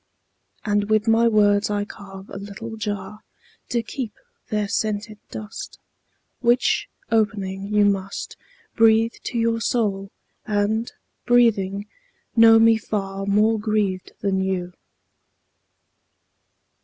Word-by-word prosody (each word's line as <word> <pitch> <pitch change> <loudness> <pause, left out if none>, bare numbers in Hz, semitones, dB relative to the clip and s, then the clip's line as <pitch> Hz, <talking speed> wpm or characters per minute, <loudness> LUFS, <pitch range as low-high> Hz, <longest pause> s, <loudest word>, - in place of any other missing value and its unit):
And 205 -1 +1
with 215 +1 +2
my 225 +1 +4
words 205 -2 +3
I 205 0 -1
carve 195 -1 -11
a 195 - -6
little 205 +3 -7
jar 210 -1 -5 0.5
To 235 -1 0
keep 225 -1 -5 0.3
their 210 -1 0
scented 215 +1 -2
dust, 215 +1 -8 0.6
Which, 240 +1 +2 0.2
opening, 200 -3 0
you 210 -1 +4
must 195 -1 -2 0.4
Breathe 225 0 +4
to 240 - -3
your 230 0 +1
soul, 200 -5 0 0.4
and, 215 +2 0 0.4
breathing, 205 -5 +3 0.5
know 225 -1 +8
me 225 0 +5
far 195 -2 -4
More 215 +2 +3
grieved 205 -3 -1
than 195 -2 0
you. 180 -2 -2
210 Hz, 110 wpm, -23 LUFS, 200-225 Hz, 0.6 s, know